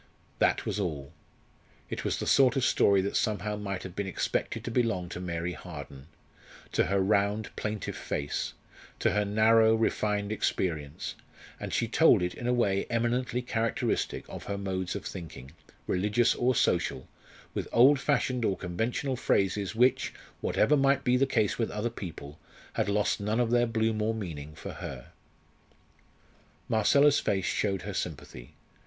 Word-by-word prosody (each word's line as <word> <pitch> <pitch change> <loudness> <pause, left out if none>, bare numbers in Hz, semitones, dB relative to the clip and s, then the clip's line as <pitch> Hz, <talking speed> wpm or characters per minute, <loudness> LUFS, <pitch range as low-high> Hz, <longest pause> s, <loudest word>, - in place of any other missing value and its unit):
That - - +2
was - - -2
all. 75 -6 -3 0.7
It - - -5
was - - -1
the - - -3
sort 135 -1 +5
of 135 - +2
story 100 -1 +4
that 100 - -3
somehow 105 0 0
might 100 -3 -4
have 95 -2 -8
been 100 -1 -2
expected 95 - -2
to 120 - -4
belong 115 -8 0
to - - -6
Mary 85 -1 -3
Harden 70 -6 -9 0.6
to - - +2
her 100 +1 +1
round, 100 +2 +1
plaintive 105 -1 -3
face, 70 -1 -3 0.4
to - - +2
her 105 +2 +1
narrow, 110 +2 +4
refined 105 -2 0
experience; 80 -8 -2 0.5
and - - -5
she - - 0
told - - +5
it 90 - -1
in 120 - -5
a - - +3
way 100 -6 +1
eminently 120 +1 0
characteristic 115 -2 -1
of - - -8
her 100 - -3
modes 95 -2 -3
of - - -5
thinking, 80 -7 -8 0.3
religious 105 +5 +2
or 125 +1 +1
social, 65 - +1 0.5
with - - -3
old 135 +4 +6
fashioned 130 -3 0
or 95 -4 +1
conventional 110 +9 -2
phrases 100 -2 0
which, 125 +2 +2 0.2
whatever 150 - +2
might 140 0 +3
be 125 -1 +3
the 135 +2 +3
case 110 -5 +1
with 115 - 0
other 105 +3 -2
people, 80 -8 -8 0.3
had - - 0
lost 105 +1 +1
none 105 +3 -1
of 120 -2 +1
their 120 0 +3
bloom 110 -1 0
or 110 +1 0
meaning 75 -8 -6
for - - -7
her. 60 -2 -8 1.6
Marcella's 140 +7 +4
face 95 -2 0
showed 100 -3 0
her 100 +2 -5
sympathy. 70 -8 -6
105 Hz, 160 wpm, -29 LUFS, 90-115 Hz, 1.6 s, old